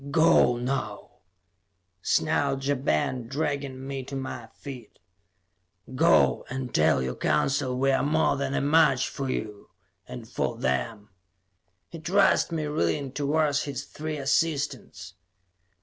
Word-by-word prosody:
"Go, 160 -5 +4
now!" 120 -4 -3 0.9
snarled 135 +7 +1
Ja 145 - +2
Ben, 125 - -1
dragging 140 -1 -3
me 135 0 -4
to 135 - -7
my 130 -3 -5
feet. 125 0 -11 1.0
"Go, 165 +6 +4
and 130 -1 -5
tell 75 -4 +3
your 65 0 -2
Council 125 - 0
we 135 +1 +2
are 135 - +2
more 155 +2 +2
than 140 0 -2
a - - +1
match 145 -3 +3
for 135 -1 -4
you 105 -4 -5 0.4
and 65 - -8
for - - -2
them." 105 - -2 0.8
He 165 - -9
thrust 185 +3 +3
me, 160 -2 -2
reeling, 135 - -1
towards 145 +1 0
his 140 -2 -4
three 155 +1 -5
assistants. 145 - -1
135 Hz, 130 wpm, -26 LUFS, 120-145 Hz, 1.0 s, Go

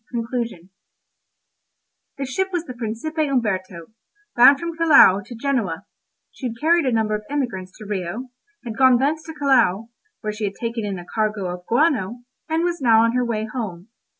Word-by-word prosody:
CONCLUSION 230 -6 -4 1.5
The 275 - -3
ship 375 +9 -1
was 350 -2 -2
the 255 - -7
Principe 240 +7 -5
Umberto, 185 -9 -2 0.4
bound 275 +4 +7
from 335 0 -4
Callao 295 - +6
to 240 - -10
Genoa; 230 -9 -2 0.5
she 260 - -5
had 230 -1 -7
carried 330 -1 +3
a - - +2
number 220 -2 +1
of 210 - -1
emigrants 230 -11 -3
to 215 - -10
Rio, 205 +5 -4 0.3
had 225 -2 -5
gone 260 -1 +5
thence 295 +5 0
to 320 - -7
Callao, 235 -7 +2 0.3
where 215 0 -3
she 210 0 -3
had 200 -1 -4
taken 230 -1 -3
in 200 -2 -3
a 175 - -9
cargo 210 -3 -2
of 180 0 -11
guano, 245 - +1 0.3
and 320 +1 +1
was 345 -3 -1
now 225 -3 +5
on 230 - +3
her 250 +1 +1
way 220 -2 -2
home. 215 -5 -6
235 Hz, 180 wpm, -22 LUFS, 210-275 Hz, 1.5 s, bound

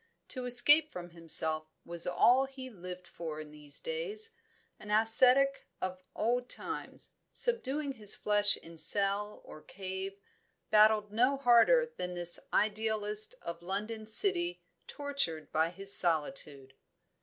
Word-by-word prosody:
To 255 -2 -6
escape 290 +6 +4
from 175 -1 -9
himself 160 -2 0 0.2
was 170 0 -3
all 245 +8 +3
he 265 -1 -11
lived 180 -2 -10
for 160 -2 -8
in 155 -1 -10
these 150 -1 -5
days. 455 -2 -2 0.5
An 210 - -12
ascetic 250 +6 +3
of 185 0 -5
old 245 +3 -2
times, - - -7 0.2
subduing 300 - -1
his 215 -6 +2
flesh 205 -1 +3
in 165 0 -10
cell 200 +2 -1
or 155 - -13
cave, 190 +2 -8 0.5
battled 215 -1 +3
no 250 +6 +1
harder 375 - +3
than 180 0 -5
this 175 0 -4
idealist 215 0 +1
of 170 0 -7
London 215 +4 -5
City 350 - +2 0.2
tortured 280 - -3
by 160 +1 0
his 195 +3 +4
solitude. 145 -5 0
210 Hz, 130 wpm, -30 LUFS, 175-260 Hz, 0.5 s, escape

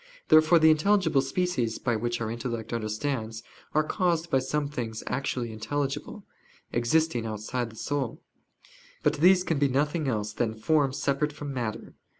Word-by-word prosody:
Therefore 155 +2 +7
the 160 -1 +6
intelligible 160 -3 +3
species, 135 -5 -1
by 120 -2 0
which 120 +2 -2
our 110 -1 -2
intellect 115 -1 -4
understands, 110 0 -3 0.3
are 155 - +4
caused 170 0 0
by 135 - +4
some 145 +3 -1
things 115 -6 -5
actually 125 -3 -2
intelligible, 145 - -3 0.5
existing 120 +1 +1
outside 110 +3 -3
the 110 - -14
soul. 140 0 -3 0.8
But 150 0 +2
these 180 +4 +5
can 160 -5 0
be 140 - +4
nothing 145 +3 0
else 105 -4 -1
than 110 -1 -1
forms 140 +3 +1
separate 145 +2 0
from 145 -1 -6
matter. 120 -4 -4
135 Hz, 150 wpm, -27 LUFS, 115-155 Hz, 0.8 s, Therefore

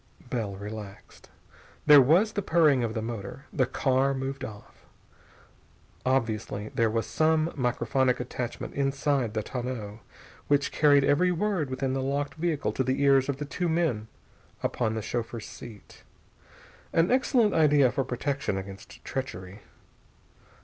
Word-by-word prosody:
Bell 110 -6 -2
relaxed. 100 0 -9 0.6
There 145 -2 +9
was 175 - +4
the 205 - -1
purring 155 -8 +3
of 115 0 -2
the 110 - -2
motor. 115 +4 -6
The 130 -4 +2
car 135 +1 +1
moved 135 +1 -4
off. 105 -4 -10 1.2
Obviously 110 -5 -1
there 115 -1 +1
was 115 +1 -1
some 160 +1 +1
microphonic 125 0 0
attachment 120 -1 -5
inside 135 -4 0
the 110 - -1
tonneau 120 -4 -5 0.5
which 145 -1 +2
carried 145 -2 +4
every 180 +6 +3
word 180 -5 -1
within 130 0 -2
the 135 - -1
locked 140 +2 -2
vehicle 160 -2 -1
to 130 - -1
the 130 +1 -1
ears 135 -1 +4
of 140 - -1
the 150 - -4
two 175 +4 -2
men 160 -10 0 0.6
upon 110 -2 -1
the 110 - -3
chauffeur's 115 -1 -4
seat. 110 -4 -12 0.9
An 165 +4 +2
excellent 245 -4 +3
idea 145 -5 +4
for 135 - -1
protection 130 -3 -2
against 95 +3 -9
treachery. 100 -7 -5
130 Hz, 140 wpm, -27 LUFS, 115-145 Hz, 1.2 s, There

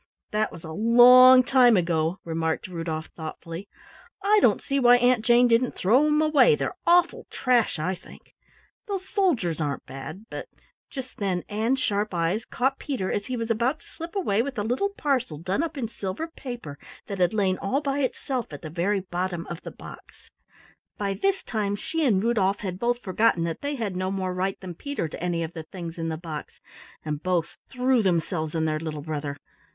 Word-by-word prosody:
"That 215 +1 0
was 165 - -11
a 160 - -7
long 250 +5 +8
time 245 -3 +5
ago," 165 0 0
remarked 160 0 -2
Rudolf 165 -3 -4
thoughtfully. 165 +3 -7 0.6
"I 420 +1 +5
don't - - +4
see 275 0 -1
why 245 -1 +7
Aunt 245 -2 +3
Jane 240 +1 +5
didn't 235 +2 +2
throw 250 +10 +3
'em 300 +1 +3
away, 310 - +5
they're - - -3
awful 350 0 +3
trash, 245 -7 +1
I 155 +5 -1
think. 180 - -14 0.5
Those 385 -2 -4
soldiers 265 - 0
aren't 145 -2 -3
bad, 135 +10 -8
but - - -7 0.2
" - - -65
Just 260 -2 -8
then 185 -4 -1
Ann's 225 +5 0
sharp 205 -4 -1
eyes 170 +7 0
caught 265 +2 -1
Peter 235 -10 -3
as 205 - -2
he 255 -1 -3
was 230 0 -2
about 240 +7 0
to - - -22
slip 330 +3 -9
away 230 - +1
with 260 0 -4
a 205 - 0
little 250 - 0
parcel 265 - -1
done 185 - -1
up 325 -2 -3
in 245 -4 -2
silver 200 +5 -4
paper 240 - -8 0.3
that 200 -2 -6
had 180 0 +3
lain 195 -4 +1
all 230 +8 0
by 280 -1 -2
itself 260 - -2
at 145 - -9
the 155 - -6
very 190 +4 0
bottom 180 -1 -3
of 170 - -6
the - - -7
box. - - -13 0.7
By 200 -1 -1
this 390 - 0
time 205 -3 -1
she 325 +10 -2
and 200 -5 +2
Rudolf 205 -4 +1
had 185 -3 -4
both 240 +2 0
forgotten 190 -2 +2
that 165 -1 -3
they 285 0 -2
had 215 -7 -3
no 185 +1 -1
more 190 -1 -2
right 190 +1 -2
than 185 -2 -6
Peter 285 - -4
to 160 - -8
any 170 -2 0
of 165 +1 -6
the 165 - -6
things 170 +1 -8
in 165 0 -2
the 160 - -3
box, 155 -2 -8 0.5
and 150 -1 -3
both 180 -2 -1
threw 255 -1 +2
themselves 170 -4 -1
on 160 -1 +1
their 155 -1 0
little 155 -2 -5
brother. 145 -2 -4
205 Hz, 200 wpm, -25 LUFS, 170-255 Hz, 0.7 s, long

